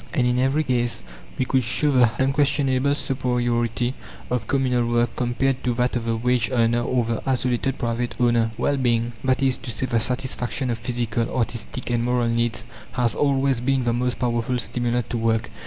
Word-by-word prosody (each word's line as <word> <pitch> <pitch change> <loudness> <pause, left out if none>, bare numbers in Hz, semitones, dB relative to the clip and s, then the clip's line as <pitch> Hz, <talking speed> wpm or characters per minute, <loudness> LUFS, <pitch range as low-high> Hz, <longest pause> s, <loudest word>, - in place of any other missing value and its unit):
And 125 - +2
in 125 0 +2
every 135 +4 +2
case 120 -3 -1 0.3
we 130 - +1
could 130 +1 +2
show 130 +5 +1
the 125 -4 +5
unquestionable 140 0 +2
superiority 120 -2 0 0.4
of 120 -3 -1
communal 125 -3 +1
work 120 0 +1
compared 130 +2 0
to 125 -2 0
that 125 +1 0
of 120 -1 -2
the 115 0 0
wage 125 0 +1
earner 120 -1 +2
or 120 0 0
the 115 -1 -2
isolated 130 0 0
private 120 -1 -2
owner. 120 -2 +3
Well 145 -1 +1
being 120 -2 +1
that 130 0 +1
is 130 -1 +2
to - - -8
say, 120 +3 -2
the 120 -2 +1
satisfaction 125 +1 -2
of 115 - -3
physical, 120 -1 -2
artistic, 120 +1 -3
and 120 -1 +1
moral 120 -1 +1
needs, 115 0 -1 0.3
has 120 -2 +1
always 135 -3 +1
been 135 0 +1
the 120 -1 +1
most 125 +1 -1
powerful 120 0 0
stimulant 120 0 -1
to 120 - -1
work. 115 0 0
125 Hz, 185 wpm, -23 LUFS, 120-130 Hz, 0.4 s, the